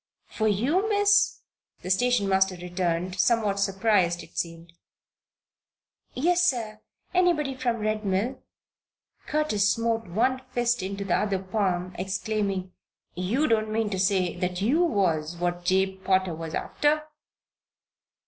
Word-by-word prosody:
"For 220 - -2
you, 280 - +1
Miss?" 410 -1 +3 0.4
the 185 - -2
station 245 +1 +2
master 190 -1 +2
returned, 180 0 -2
somewhat 205 -1 +2
surprised 195 -3 +1
it - - -17
seemed. 165 0 -5 1.4
"Yes, 350 +6 +2
sir. 225 -9 0 0.3
Anybody 345 -6 +2
from 245 -3 -1
Red 215 0 -2
Mill?" 210 +7 -1 0.9
Curtis 255 -10 +1
smote 225 0 0
one 250 +8 0
fist 240 -2 +1
into 195 +1 -4
his 190 -3 -1
other 200 -2 +1
palm, 185 -2 -2
exclaiming: 195 -1 -2 0.4
"You 205 - 0
don't 220 -2 +1
mean 220 -1 0
to 190 - -2
say 185 -2 +1
that 180 0 -2
you 255 - +2
was 175 - 0
what 175 0 -2
Jabe 190 +1 +1
Potter 185 -2 +2
was 160 0 -6
after?" 300 +1 0
200 Hz, 130 wpm, -26 LUFS, 185-240 Hz, 1.4 s, Miss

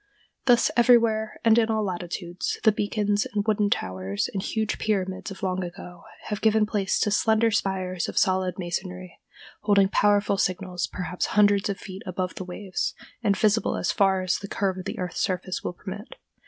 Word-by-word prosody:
Thus, 245 -2 +4
everywhere, 230 -3 +3
and 225 0 +6
in 225 -1 +2
all 220 -1 +1
latitudes, 175 -1 -3
the 220 - +6
beacons 205 0 0
and 205 -1 +1
wooden 210 -2 +2
towers 95 - -1
and 195 - -2
huge 220 +2 -2
pyramids 190 -2 -1
of 195 0 -10
long 185 0 -1
ago 175 -1 -9 0.2
have 210 -2 -4
given 220 0 +4
place 205 -2 0
to 210 - +2
slender 220 +2 +3
spires 190 -3 -1
of - - -8
solid 185 -1 +2
masonry, 180 0 -5 0.4
holding 200 -2 +4
powerful 205 0 +3
signals 185 -1 -1
perhaps 180 0 -3
hundreds 205 -1 +4
of 195 - -2
feet 190 0 -9
above 185 0 -2
the - - -6
waves, 185 +1 -3 0.3
and 205 -4 +2
visible 215 +1 +2
as - - 0
far 190 -2 +2
as 185 - 0
the 200 - -7
curve 195 -2 -1
of 185 - -7
the - - -4
earth's 180 -2 -3
surface 185 0 -2
will - - -3
permit. 200 +4 -8
195 Hz, 180 wpm, -25 LUFS, 185-210 Hz, 0.4 s, and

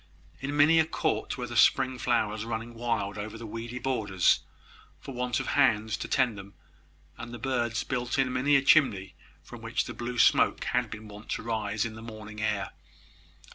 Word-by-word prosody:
In 140 +2 -3
many 155 +3 +6
a 160 - +4
court 160 -3 -1
were 125 - -3
the 120 0 -7
spring 130 +2 +4
flowers 110 -4 0
running 115 +1 -5
wild 110 -4 -2
over 110 +2 -6
the 115 - -8
weedy 115 +3 -6
borders, 110 -8 +2 0.6
for 135 - -9
want 125 -1 -1
of - - -4
hands 110 -6 +2
to - - -5
tend 125 -6 +1
them; 100 +1 -12 0.6
and 120 0 -7
the 120 - -6
birds 120 -2 -1
built 125 -1 -2
in 130 -2 +1
many 140 +3 +3
a 135 - +4
chimney 100 -11 +3 0.3
from - - -11
which - - -1
the - - -6
blue 120 +1 -5
smoke - - +4
had - - 0
been 110 0 -8
wont 105 +1 -12
to - - -3
rise 110 -2 -1
in 115 - -5
the 110 - -10
morning 110 -1 -9
air. 105 -2 -1
115 Hz, 190 wpm, -28 LUFS, 110-130 Hz, 0.6 s, many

